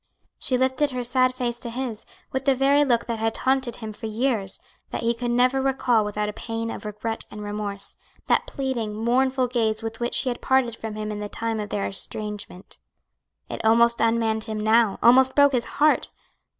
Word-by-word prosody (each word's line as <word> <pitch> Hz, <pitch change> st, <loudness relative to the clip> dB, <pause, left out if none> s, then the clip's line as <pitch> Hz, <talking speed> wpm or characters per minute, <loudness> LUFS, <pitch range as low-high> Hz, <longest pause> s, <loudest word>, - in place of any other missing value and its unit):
She 255 Hz, -, +2 dB
lifted 260 Hz, +3 st, +1 dB
her 250 Hz, -2 st, -3 dB
sad 255 Hz, +1 st, +2 dB
face 240 Hz, -2 st, -2 dB
to 235 Hz, -, -6 dB
his, 235 Hz, -2 st, -5 dB, 0.2 s
with 265 Hz, 0 st, -3 dB
the 275 Hz, -2 st, +4 dB
very 280 Hz, +2 st, +4 dB
look 240 Hz, -4 st, +1 dB
that 230 Hz, -2 st, -3 dB
had 225 Hz, 0 st, 0 dB
taunted 260 Hz, -2 st, +1 dB
him 220 Hz, -2 st, -7 dB
for 220 Hz, +2 st, -6 dB
years, 220 Hz, -3 st, 0 dB, 0.3 s
that -, -, -4 dB
he 230 Hz, +1 st, +2 dB
could 240 Hz, +1 st, -3 dB
never 250 Hz, +2 st, +3 dB
recall 255 Hz, -4 st, +2 dB
without 210 Hz, 0 st, -2 dB
a 210 Hz, -, -4 dB
pang 225 Hz, +1 st, -4 dB
of -, -, -8 dB
regret 210 Hz, +2 st, -3 dB
and 210 Hz, 0 st, -8 dB
remorse 205 Hz, -1 st, -4 dB, 0.3 s
that -, -, +2 dB
pleading, 245 Hz, -6 st, -3 dB
mournful 255 Hz, +4 st, +1 dB
gaze 225 Hz, -3 st, 0 dB
with 225 Hz, 0 st, -5 dB
which 240 Hz, 0 st, -2 dB
she 265 Hz, -, +1 dB
had 240 Hz, -, -4 dB
parted 260 Hz, -3 st, +2 dB
from 220 Hz, -1 st, -6 dB
him 215 Hz, 0 st, -4 dB
in 210 Hz, -, -5 dB
the 210 Hz, 0 st, -5 dB
time 225 Hz, 0 st, -3 dB
of 205 Hz, -1 st, -4 dB
their 200 Hz, -, -2 dB
estrangement. 210 Hz, -1 st, -5 dB, 0.7 s
It -, -, -6 dB
almost 235 Hz, +1 st, +4 dB
unmanned 225 Hz, -1 st, +1 dB
him 215 Hz, -1 st, -4 dB
now, 220 Hz, -1 st, +3 dB
almost 260 Hz, +2 st, +6 dB
broke 285 Hz, -1 st, +6 dB
his 245 Hz, -3 st, 0 dB
heart. 300 Hz, +1 st, +2 dB
235 Hz, 200 wpm, -24 LUFS, 215-255 Hz, 0.7 s, almost